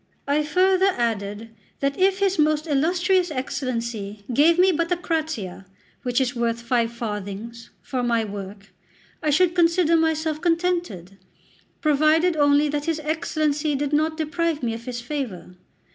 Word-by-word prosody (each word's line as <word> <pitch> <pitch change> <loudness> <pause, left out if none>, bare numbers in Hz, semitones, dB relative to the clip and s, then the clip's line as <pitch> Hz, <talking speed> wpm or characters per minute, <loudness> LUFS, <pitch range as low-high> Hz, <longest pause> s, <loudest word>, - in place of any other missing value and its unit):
I 285 +2 +2
farther 375 +4 +3
added 220 -1 -2 0.3
that 275 0 0
if 385 +1 +2
his 390 -3 +1
most 305 0 +2
illustrious 350 +5 +1
Excellency 235 -7 -4
gave 320 +7 +5
me 370 +1 +5
but 335 +1 -1
a 355 - +2
'crazia,' 310 - -3 0.3
which 245 -1 0
is 255 -2 0
worth 235 -1 -1
five 235 -1 0
farthings, 225 0 -6
for 255 -2 -3
my 235 -2 +1
work, 200 -1 -8 0.5
I 305 - 0
should 345 +4 +3
consider 335 -1 +3
myself 315 -1 0
contented, 335 - -1 0.6
provided 310 +3 +3
only 290 0 +4
that 295 0 -2
his 325 -2 -1
Excellency 305 -1 -1
did 290 +1 -2
not 310 +1 +1
deprive 320 -1 -1
me 230 -2 0
of 230 +1 -8
his 245 -1 -5
favour. 240 - -5
295 Hz, 145 wpm, -23 LUFS, 235-330 Hz, 0.6 s, gave